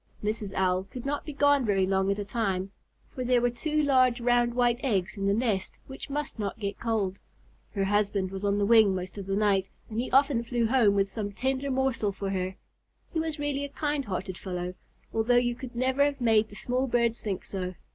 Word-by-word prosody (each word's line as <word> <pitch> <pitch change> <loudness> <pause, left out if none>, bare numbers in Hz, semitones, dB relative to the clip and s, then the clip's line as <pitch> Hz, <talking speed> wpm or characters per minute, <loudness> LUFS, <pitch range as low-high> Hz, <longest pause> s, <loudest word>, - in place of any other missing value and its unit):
Mrs. 210 -1 -2
Owl 185 0 +1
could 245 +5 -9
not 285 +1 -2
be 300 - -5
gone 285 -1 +4
very 195 -4 +2
long 190 0 +1
at 200 - +1
a 205 - -3
time, 195 -3 -1 0.4
for 255 - -3
there 250 0 +3
were 245 0 +1
two 305 +5 0
large 255 -3 +4
round 240 0 +2
white 240 -1 +2
eggs 210 -7 0
in 195 -1 -2
the - - +3
nest 215 -5 -1
which 265 +2 -9
must 290 -3 -4
not 205 0 -3
get 200 -2 -4
cold. 210 -5 -1 0.6
Her 195 - +1
husband 200 -1 +1
was 195 +1 -6
on 200 0 +2
the 205 - +2
wing 215 -3 +6
most 185 +2 -5
of 195 - -7
the 195 - 0
night, 195 -2 +2 0.2
and 220 - -2
he 245 - -2
often 270 -3 +3
flew 235 0 0
home 225 -4 +4
with 195 0 +2
some 205 0 -4
tender 265 +5 -1
morsel 260 -5 0
for 195 0 -4
her. 185 0 -2 0.6
He 325 - 0
was 320 -1 -2
really 290 -1 -2
a 285 - -4
kind 290 -1 -2
hearted 185 -1 -4
fellow, 180 -1 -4 0.4
although 225 +2 +2
you 240 0 +2
could 245 0 -9
never 260 +3 +2
have 285 -1 0
made 220 -3 +3
the 205 - -12
small 250 +4 -1
birds 235 -1 +1
think 195 -4 -3
so. 185 -2 -4
225 Hz, 220 wpm, -28 LUFS, 195-255 Hz, 0.6 s, wing